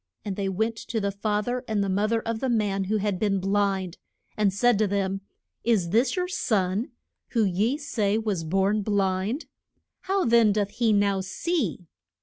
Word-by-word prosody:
And 200 -2 -3
they 195 -1 -1
went 220 +4 -1
to 225 0 -3
the 200 -1 -1
fa 210 +1 -1
ther 245 +1 -2
and 210 -2 0
the - - -1
mo 200 +2 +1
ther 225 +1 +1
of 230 0 -3
the 265 - -1
man 205 -4 +1
who 215 +3 0
had 205 -3 -1
been 200 -2 +1
blind, 195 -2 0 0.4
and 210 -2 +2
said 225 +2 +3
to 215 - +3
them, 195 -1 -1 0.4
Is 210 -8 +2
this 240 +5 +3
your 360 -1 -1
son, 210 - 0 0.4
who 225 -3 +3
ye 205 +9 +1
say 215 -8 0
was 210 -6 -1
born 195 +5 +1
blind? 200 - 0 0.6
How 390 0 +1
then 230 -3 +5
doth 205 -1 0
he 230 +1 +1
now 200 -2 +2
see? 200 - -2
205 Hz, 185 wpm, -26 LUFS, 195-230 Hz, 0.6 s, then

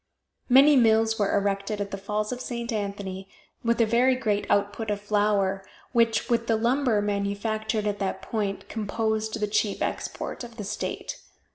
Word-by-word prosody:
Many 275 +4 +7
mills 225 -2 +4
were 205 0 +2
erected 200 +1 -1
at 200 -1 -3
the - - -2
Falls 210 +2 -2
of 250 0 -4
St. 235 -1 -4
Anthony, 200 -2 -4 0.3
with 235 0 +1
a 230 - +5
very 245 +4 +3
great 215 -5 -1
output 205 +2 0
of 205 -1 -1
flour, 205 -2 +1 0.3
which, 230 -2 +2
with 230 -1 +1
the 225 - +3
lumber 235 -1 +2
manufactured 205 +2 -1
at 205 -1 -1
that 195 -1 -2
point, 205 -3 -3
composed 220 +1 -2
the 210 - +1
chief 205 0 0
export - - -4
of 235 -1 -10
the 210 - -4
state. 205 +2 -4
215 Hz, 165 wpm, -26 LUFS, 200-230 Hz, 0.3 s, Many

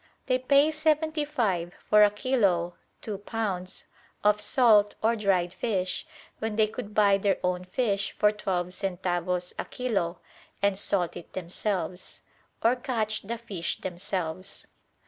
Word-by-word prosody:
They 255 0 +2
pay 280 +4 +4
seventy 310 0 +1
five 190 - -1
for 210 0 +7
a 205 - +7
kilo 205 -7 +1 0.3
(two 205 -3 -4
pounds) 200 -4 -3 0.4
of 210 0 +4
salt 210 -2 +4
or 230 +1 +4
dried 190 -5 +1
fish, 185 - -2 0.3
when 220 -1 -2
they 220 0 +4
could 210 -1 -7
buy 200 -2 +5
their 200 0 +2
own 180 0 0
fish 200 0 0
for 210 - +5
twelve 185 -4 -2
centavos 180 -1 -2
a - - -2
kilo 200 -9 -1 0.4
and 200 -1 +2
salt 180 -4 0
it 175 - -11
themselves: 185 0 -3 0.4
or 235 +2 +5
catch 225 -4 -1
the 230 +4 -4
fish 200 -7 -4
themselves. 180 -1 -4
205 Hz, 140 wpm, -28 LUFS, 180-225 Hz, 0.4 s, for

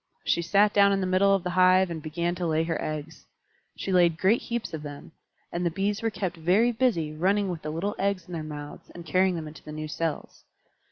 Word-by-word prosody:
She 170 - +2
sat 200 +5 +3
down 200 -1 +5
in 195 - +1
the 190 - -1
middle 190 +2 +3
of 190 - -2
the 180 - -2
hive 185 0 +4
and 160 -2 -5
began 170 +3 -2
to 175 -1 -3
lay 160 0 +1
her 165 0 -2
eggs. 155 +1 -6 0.5
She 195 - -3
laid 175 -3 +4
great 200 +7 +3
heaps 235 -6 -4
of 160 - -4
them, 145 0 -9 0.4
and 175 - -2
the 170 - +2
Bees 200 +4 -1
were 225 - +1
kept 190 -5 -4
very 190 +9 +3
busy 220 -11 0
running 195 +4 +1
with 170 -3 -4
the 155 - -5
little 170 +7 -2
eggs 195 -3 0
in 180 - -10
their 165 - -3
mouths 150 -1 -8
and 170 -1 -9
carrying 185 +3 +2
them 160 -2 -5
into 150 - -11
the 150 - -10
new 155 0 -5
cells. 160 0 -4
175 Hz, 235 wpm, -27 LUFS, 160-195 Hz, 0.5 s, down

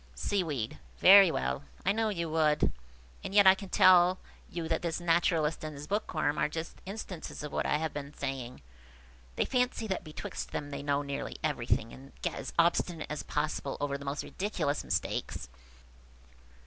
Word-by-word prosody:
Seaweed. 150 - -2 0.2
"Very 195 0 +9
well, 65 - -2 0.2
I 195 - +4
know 220 +1 +1
you 170 -5 -2
would; 155 -2 +2 0.5
and 195 - -5
yet 205 -1 +7
I 190 - +10
can 195 0 -8
tell 180 0 +6 0.3
you 165 -1 -4
that 160 0 0
this 170 -1 -2
naturalist 165 -2 +1
and 155 -1 -5
his 140 +1 -7
bookworm 195 -7 -1
are - - +2
just 160 +2 -6
instances 190 -7 -6
of 150 - -5
what - - -1
I - - +2
have 160 +1 -3
been 140 -1 -6
saying. 130 -3 -5 0.7
They - - +1
fancy 250 -2 0
that 190 -3 -2
betwixt 155 -2 -6
them 145 0 -4
they 140 0 -4
know 145 0 0
nearly 140 -1 -4
everything, 120 -6 0
and 135 +1 -13
get - - 0
as - - -6
obstinate 170 -1 +1
as 150 - -3
possible 150 -2 -2
over 145 -1 -1
the 140 - -6
most 140 +2 -2
ridiculous 185 -7 -2
mistakes." - - -2
155 Hz, 175 wpm, -30 LUFS, 140-185 Hz, 0.7 s, I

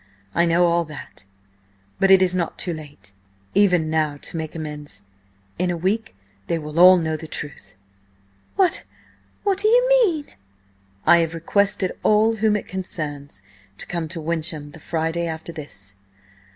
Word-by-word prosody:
I 170 - +3
know 170 +1 +4
all 170 0 +2
that, 150 -9 -11 0.7
but 195 - +3
it 190 -1 +7
is 180 -1 +1
not 175 -2 -2
too 175 - -2
late 145 -9 -11 0.4
even 180 -5 +3
now 155 -2 0
to - - -3
make 160 -1 -5
amends. 150 -9 -7 0.6
In 180 0 +1
a 175 - -1
week 195 - -1 0.3
they 170 - 0
will 150 +1 -4
all 185 +1 +9
know 160 -2 -1
the 160 +1 -7
truth." 140 -11 -6 0.8
"What–what 390 +1 -2
do 425 - +3
you - - +4
mean?" 320 -8 0 0.8
"I 170 - +7
have 165 -1 0
requested 195 +2 0
all 220 +1 +3
whom 215 0 +2
it 210 - -3
concerns 145 - -5 0.3
to - - -6
come 170 -2 -3
to 165 +2 -6
Wyncham 155 -2 -3
the 160 - -13
Friday 165 +2 -2
after 160 +1 -6
this." 100 - -10
170 Hz, 155 wpm, -22 LUFS, 155-190 Hz, 0.8 s, all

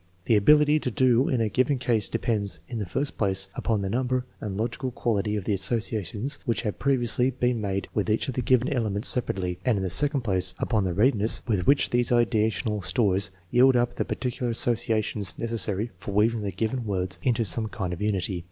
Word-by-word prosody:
The 115 - +3
ability 150 +8 +5
to 130 - -2
do 125 +2 +2
in 125 -3 +1
a 110 - +2
given 130 +5 +1
case 115 -4 +1
depends, 105 -7 -1
in 115 - -5
the 100 - -4
first 135 +10 -3
place, 95 -2 +1
upon 110 -3 -1
the 95 - -2
number 125 +1 -1
and 100 -3 -5
logical 120 +4 -2
quality 105 -4 -1
of 105 - -3
the 105 - -1
associations 110 - -1
which 120 -3 -1
have 105 -3 -3
previously 125 -2 +1
been 125 -2 -1
made 100 -1 -2
with 105 -4 -1
each 105 - 0
of 130 - -3
the 125 - -2
given 125 +1 +2
elements 110 -6 0
separately, 90 -7 0
and 125 -5 +2
in 95 - -2
the 95 - -2
second 140 - +2
place, 95 -5 +1
upon 110 -5 0
the 90 - -1
readiness 110 0 +2
with 100 -7 0
which 140 - +3
these 120 -1 +1
ideational 110 -3 +1
stores 100 -4 +1 0.2
yield 130 +1 +5
up 120 0 +1
the - - -2
particular 125 -1 -3
associations 110 -4 0
neces 115 0 -3
sary 105 +4 0
for 100 +1 -6
weaving 110 +2 +2
the 100 -1 -3
given 110 +6 -2
words 95 -2 -2
into 120 -3 +1
some 110 +4 +2
kind 95 -5 -4
of 90 - -7
unity. 95 -3 -1
110 Hz, 205 wpm, -26 LUFS, 100-125 Hz, 0.2 s, ability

